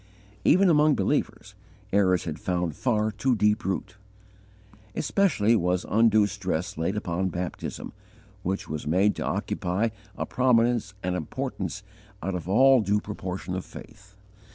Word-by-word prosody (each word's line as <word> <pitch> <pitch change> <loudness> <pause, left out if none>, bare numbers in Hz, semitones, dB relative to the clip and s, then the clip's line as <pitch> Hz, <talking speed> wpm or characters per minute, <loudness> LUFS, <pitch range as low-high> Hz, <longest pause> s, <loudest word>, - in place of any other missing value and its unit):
Even 190 +4 +5
among 150 -3 +4
believers, 95 - -1 0.4
errors 95 -3 +3
had 80 -2 -5
found 90 -4 -2
far 110 -4 0
too 120 +4 0
deep 105 +1 +2
root. 95 +2 -3 1.0
Especially 140 - +2
was 90 -2 0
undue 110 0 +4
stress 95 -3 -3
laid 85 +6 -1
upon 95 -2 -1
baptism, 90 -1 -5 0.5
which 95 +1 -3
was 75 -1 -5
made 95 +6 +3
to - - -2
occupy 95 +6 -1 0.3
a - - -2
prominence 120 -4 +2
and 90 0 -1
importance 80 -4 -4 0.4
out 95 +2 -2
of 90 0 -5
all 130 +4 +6
due 105 0 +1
proportion 95 -4 -5
of 95 0 -3
faith. 105 -3 -13
100 Hz, 135 wpm, -26 LUFS, 90-115 Hz, 1.0 s, all